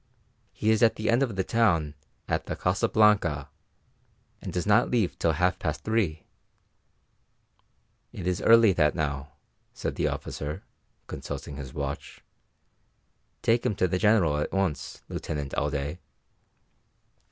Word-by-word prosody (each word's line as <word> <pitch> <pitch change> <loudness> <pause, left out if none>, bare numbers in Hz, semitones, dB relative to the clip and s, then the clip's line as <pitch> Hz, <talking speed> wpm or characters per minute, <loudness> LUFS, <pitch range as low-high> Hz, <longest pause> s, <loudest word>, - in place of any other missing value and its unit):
"He 105 +2 0
is 110 - +2
at 115 -2 +5
the 110 +1 0
end 120 +3 +3
of 120 -7 0
the 95 - 0
town 85 -10 +2 0.3
at - - -1
the - - -3
Casa 90 +1 0
Blanca, 90 -10 +3 0.9
and - - -6
does 90 - -2
not 105 0 +4
leave 115 -7 +1
till 80 - +2
half 90 +3 +1
past 75 -1 -3
three." 105 -8 0 1.9
"It 90 - -7
is 90 -1 0
nearly 115 -3 +6
that 75 -4 +2
now," 75 -3 -3 0.4
said - - -4
the - - +1
officer, 75 +1 -5 0.4
consulting 70 - -7
his 70 -3 -7
watch. - - -5 1.2
"Take 115 +1 +3
him 120 -5 0
to 95 -1 +2
the 90 +1 -1
General 95 -9 +3
at - - -2
once, 95 -6 -2
Lieutenant 70 -2 -5
Alday." 70 0 -2
90 Hz, 140 wpm, -27 LUFS, 75-110 Hz, 1.9 s, nearly